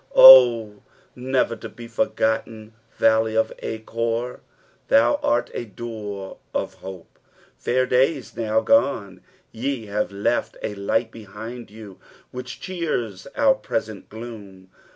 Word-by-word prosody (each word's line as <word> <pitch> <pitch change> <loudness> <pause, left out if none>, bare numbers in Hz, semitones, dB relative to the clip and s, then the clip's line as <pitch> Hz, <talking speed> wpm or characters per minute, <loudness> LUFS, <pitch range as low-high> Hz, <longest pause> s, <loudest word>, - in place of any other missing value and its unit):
Oh, 115 -5 +8 0.3
never 125 -1 0
to 110 - -9
be 120 +1 -11
for^tten 110 -1 -1 0.3
valley 110 0 +3
of 110 - +1
Achor, 115 +2 -3 0.3
' - - -36
thou 115 +2 +4
art 120 - 0
a 120 - -4
door 105 -3 -7 0.2
of - - -3
nope! 95 -3 -11 0.4
Fair 130 +1 0
days, 130 +2 +1
now 110 -1 0
gone, 110 - +1 0.3
ye 125 0 -3
have 105 0 -2
left 100 +4 -1
a - - -3
light 110 +3 -1
behind 115 +2 -9
you 105 -3 -12 0.3
which 125 +1 -7
cheere 165 - -3 0.2
our 280 -2 +4
present 110 - -5
gloom. 105 -5 -10
115 Hz, 125 wpm, -23 LUFS, 105-125 Hz, 0.4 s, Oh